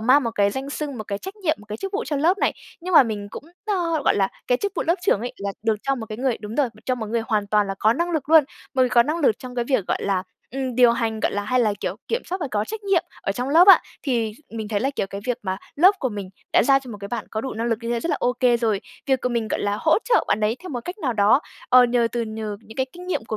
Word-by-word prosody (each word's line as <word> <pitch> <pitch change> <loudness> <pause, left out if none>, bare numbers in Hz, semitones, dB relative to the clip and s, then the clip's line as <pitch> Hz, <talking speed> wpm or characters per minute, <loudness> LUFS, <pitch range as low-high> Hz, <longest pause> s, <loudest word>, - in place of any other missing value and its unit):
mang 255 +6 +5
một 230 - -1
cái 200 0 +3
danh 265 +5 -5
xưng, 285 -3 -4
một 215 - -5
cái 200 0 -4
trách 385 - -8
nhiệm, 325 -6 0
một 210 - -16
cái 210 - -4
chức 390 - -5
vụ 425 +4 -2
cho 295 - -2
lớp 335 +8 +2
này. - - +2 0.3
Nhưng 360 +1 -3
mà - - +10
mình 210 -4 -4
cũng, - - -8 0.2
ơ, 340 -7 0
gọi - - +3
là, 195 -1 +2 0.2
cái 245 - +3
chức 405 -1 -2
vụ - - 0
lớp 335 - +4
trưởng 360 - +2
ấy 245 +2 -4
là 200 0 -4
được 225 -1 +1
cho 275 0 +1
một 230 -4 -6
cái 215 - -6
người 255 -2 0
đúng 210 +1 -7
rồi, 285 -4 +2 0.2
cho 255 - +1
một 230 -3 -5
người 230 +2 -1
hoàn 210 -2 0
toàn 210 0 +2
là 195 - -3
có 220 - +4
năng 340 +7 -1
lực 310 -4 -2
luôn, 320 -2 +7 0.3
một 260 - +4
người 255 - +3
có 240 -1 +5
năng 305 +7 -2
lực 270 -9 +2
trong 250 -1 -9
cái 240 -1 -1
việc, 240 -7 0
gọi - - 0
là, 195 -2 0 0.3
ừm, 260 -1 -3
điều 245 -1 +6
hành, 225 -2 -2
gọi - - 0
là, 205 - -1
hay 250 +4 +1
là, 215 -3 +2
kiểu, - - -3
kiểm 465 +2 -1
soát 370 +2 -4
và 295 - -2
có 210 -1 0
trách 440 - -6
nhiệm 390 -4 +3 0.2
ở 195 - -1
trong 250 +5 -3
lớp 335 +6 +6
á, 390 - +10 0.2
thì 235 -6 0 0.2
mình 220 -2 -5
thấy 205 -2 -1
là, 270 - +1
kiểu, - - 0
cái 200 +1 -7
việc 245 -2 -1
mà 190 -1 -2 0.2
lớp 370 +7 +6
của 260 - -1
mình 200 -4 -6 0.2
đã - - +5
giao 270 +3 +5
cho 260 -2 -11
một 210 - -7
cái 200 - -6
bạn 240 - -3
có 220 - -2
đủ 265 +2 -5
năng 230 +1 -2
lực 230 -2 0
như 230 - -3
thế 235 -1 0
rất 335 - -2
là - - +1
ô 245 - +2
kê 245 -2 +4
rồi. 220 -4 0 0.3
Việc 265 -2 +2
của - - 0
mình, 235 -3 -1
gọi - - -1
là, 205 0 0
hỗ 315 +3 +4
trợ 480 - +3
bạn 210 - +1
đấy 215 +2 +1
theo 370 - -8
một 250 -4 -3
cách 360 +4 -6
nào 265 - -1
đó, 210 +5 +4 0.3
ờ, 250 0 +7
nhờ 240 -1 +2
từ 240 - -1
nhờ 220 -2 -5
những 220 0 -14
cái 260 0 0
kinh 360 +1 -10
nghiệm 360 -11 -2
của 220 -1 -4
245 Hz, 325 wpm, -23 LUFS, 215-290 Hz, 0.3 s, mà